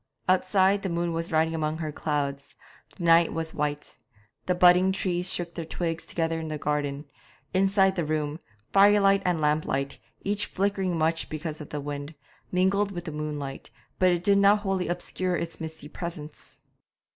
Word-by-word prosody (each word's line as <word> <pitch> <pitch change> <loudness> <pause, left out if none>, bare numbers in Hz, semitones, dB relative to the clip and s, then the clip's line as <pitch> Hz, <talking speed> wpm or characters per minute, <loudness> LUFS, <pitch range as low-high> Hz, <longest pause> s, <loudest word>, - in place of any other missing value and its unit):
Outside, 190 +2 +3
the 195 - -2
moon 170 0 -1
was 165 +1 -2
riding 160 +1 +2
among 155 -1 -1
her 155 -2 -4
clouds; 145 -2 -3 0.4
the 180 - -6
night 165 0 +5
was 160 0 -3
white. 150 0 -3 0.5
The 180 - +2
budding 180 +1 +6
trees 185 -2 0
shook 175 -1 -3
their 170 - -4
twigs 165 0 -3
together 165 -1 -1
in 160 - -5
the 155 -1 -3
garden. 145 0 -2 0.5
Inside 195 0 +3
the 175 - 0
room, 150 0 -2 0.3
firelight 200 0 +5
and 175 -3 +1
lamplight, 150 -2 0 0.2
each 205 +1 0
flickering 195 -2 -1
much 165 +1 0
because 155 0 -5
of 150 - -9
the 150 - -4
wind, 145 +2 -6 0.4
mingled 195 +2 +2
with 175 -2 -6
the 160 - -4
moonlight, 150 -2 -5 0.3
but 180 -2 +3
did 200 +1 +4
not 200 +1 +5
wholly 195 -3 -1
obscure 175 +1 -2
its 170 0 -5
misty 160 -2 -7
presence. 155 -2 -8
170 Hz, 165 wpm, -27 LUFS, 155-185 Hz, 0.5 s, budding